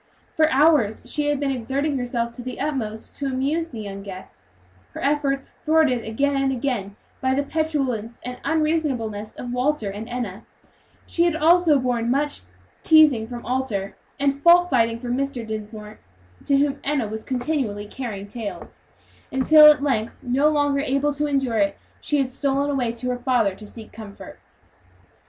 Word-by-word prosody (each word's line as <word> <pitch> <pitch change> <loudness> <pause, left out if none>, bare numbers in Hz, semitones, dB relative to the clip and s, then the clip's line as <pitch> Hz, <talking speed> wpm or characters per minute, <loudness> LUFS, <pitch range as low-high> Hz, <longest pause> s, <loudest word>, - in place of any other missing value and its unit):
For 315 0 +4
hours 285 -7 +3
she 295 -1 -2
had 290 -1 +1
been 280 -1 0
exerting 270 +4 -1
herself 240 -1 -2
to 235 - -9
the 255 0 -7
utmost 235 -7 -3
to 280 - -2
amuse 280 +6 -1
the 230 -6 -7
young 200 -1 -7
guests, 145 - -12 0.4
her - - -6
efforts 275 -1 0
thwarted 305 -7 +3
again 275 +6 0
and 270 0 +1
again 240 -7 -2 0.3
by 260 0 +1
the 285 - +1
petulance 275 -8 -2
and 250 0 -6
unreasonableness 280 -10 -1
of 245 -1 -6
Walter 250 -4 0
and 210 +3 -7
Enna; 235 -4 -5 0.6
she 340 - +1
had 340 -2 +1
also 325 -1 +4
borne 245 -3 -1
much 285 +3 0 0.4
teasing 300 -8 +5
from 240 0 -8
Arthur, 240 -7 -2 0.2
and 280 0 0
fault 350 +2 +6
finding 230 -2 +2
from 245 0 -2
Mrs. 275 -3 -3
Dinsmore, 215 -1 -7 0.5
to 280 - +3
whom 280 0 +1
Enna 275 -5 0
was 220 +1 -6
continually 250 -5 -2
carrying 210 -3 -6
tales, 215 -1 -8 0.5
until, 300 +4 +7
at 295 -1 -1
length, 235 -6 -1
no 260 +4 +2
longer 290 -2 +1
able 280 +1 0
to 295 +1 -1
endure 270 -6 0
it, 200 -1 +1 0.2
she 295 - 0
had 265 -2 0
stolen 280 +1 0
away 250 -4 0
to 235 +2 -4
her 245 - -3
father 245 -6 +1
to 210 +2 -11
seek 220 0 -11
for - - -19
comfort. 210 -3 -10
260 Hz, 170 wpm, -23 LUFS, 225-290 Hz, 0.6 s, until